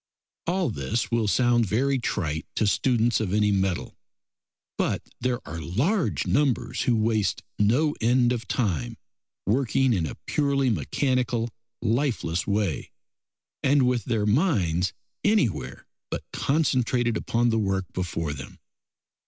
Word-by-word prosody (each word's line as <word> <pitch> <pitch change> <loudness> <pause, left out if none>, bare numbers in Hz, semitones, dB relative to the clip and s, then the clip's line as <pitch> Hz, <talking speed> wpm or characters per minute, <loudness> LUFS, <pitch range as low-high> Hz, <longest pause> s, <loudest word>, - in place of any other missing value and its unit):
All 180 -5 +1
this 115 +3 -2
will 115 -2 +1
sound 120 +1 +3
very 135 +7 +1
trite 80 -9 -2
to 110 - +2
students 120 +2 +2
of 105 -5 -2
any 105 0 +3
mettle, 95 -2 -1 0.8
but - - -1 0.2
there 125 0 -2
are 80 - -5
large 140 - 0
numbers 130 -4 +1
who 125 -3 +2
waste 110 -2 +1 0.2
no 130 +9 +3
end 120 +1 +3
of 115 -3 -5
time 85 - -1 0.5
working 130 +3 +2
in 85 -6 0
a - - -6
purely 140 -3 +1
mechanical, 120 - 0 0.3
lifeless 115 - 0
way, 100 -7 -1 0.7
and 140 0 +4
with 125 -2 +1
their 115 -5 0
minds 105 - +2 0.3
anywhere 205 - +1 0.2
but - - -4
concentrated 125 -5 +1
upon 120 +2 +1
the 115 -1 +1
work 95 -2 0
before 85 -4 -2
them. 65 -3 -9
115 Hz, 130 wpm, -26 LUFS, 100-130 Hz, 0.8 s, and